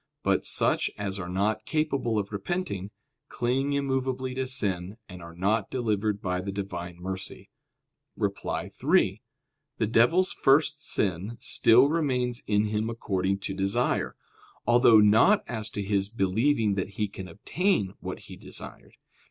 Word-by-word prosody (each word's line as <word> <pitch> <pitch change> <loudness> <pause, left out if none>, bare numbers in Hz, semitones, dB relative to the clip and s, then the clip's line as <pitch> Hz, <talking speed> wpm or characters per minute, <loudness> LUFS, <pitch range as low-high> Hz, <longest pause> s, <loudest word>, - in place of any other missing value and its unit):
But - - +1
such - - +2
as 100 -1 -3
are 90 -2 -5
not 105 +4 -1
capable 140 -7 0
of 100 -1 -2
repenting, 100 - -3 0.4
cling 135 +4 0
immovably 130 -2 -1
to 130 0 -2
sin, 100 -6 -1
and 90 -1 -10
are 85 0 -11
not 100 +4 0
delivered 105 -4 -1
by 90 -1 -1
the 100 +1 -4
Divine 90 -3 -5
mercy. 95 +1 -7 0.7
Reply - - -2
Obj. - - -12
3: - - +2 0.6
The - - +1
devil's 125 - +3
first 150 +2 +3
sin 100 - 0
still 120 +4 +5
remains 130 -6 0
in 105 0 +2
him 110 +1 -1
according 100 -4 -1
to 95 - -3
desire; 100 +6 0 0.5
although 120 -1 +6
not 110 - +5
as 110 -3 -4
to 105 - -4
his 100 0 0
believing 110 +2 +1
that 95 0 -3
he 105 - 0
can 95 -2 -8
obtain 105 - -1
what - - -6
he - - -11
desired. - - -9
105 Hz, 145 wpm, -27 LUFS, 95-130 Hz, 0.7 s, although